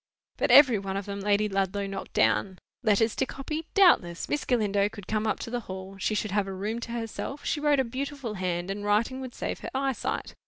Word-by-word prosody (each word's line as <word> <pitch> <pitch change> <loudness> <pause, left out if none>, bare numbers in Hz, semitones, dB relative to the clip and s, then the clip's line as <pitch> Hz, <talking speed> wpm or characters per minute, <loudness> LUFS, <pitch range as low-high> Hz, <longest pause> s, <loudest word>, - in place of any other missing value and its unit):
But - - +1
every 250 -4 +8
one 195 0 -3
of 200 - -4
them 200 0 -5
Lady 205 +1 +2
Ludlow 195 0 -1
knocked 195 0 -6
down. 190 -2 +2 0.2
Letters 220 -1 +2
to 265 - +2
copy? 305 +4 -5
Doubtless. 260 - +4
Miss 295 - -1
Galindo 205 -4 +2
could 205 -3 -10
come 215 +1 -1
up 215 - +1
to 230 - -6
the 245 - -1
Hall; 190 +1 -7
she 215 - 0
should 210 -1 -1
have 205 0 +1
a 195 - -4
room 210 +5 -3
to 235 - -6
herself; 235 +4 -5
she 300 - 0
wrote 295 -1 +3
a - - +4
beautiful 265 -1 -4
hand; 180 -1 -2
and 205 +1 -5
writing 220 +6 +1
would 255 -2 -7
save - - -3
her - - -6
eyesight. 270 -1 -2
215 Hz, 225 wpm, -27 LUFS, 195-260 Hz, 0.2 s, every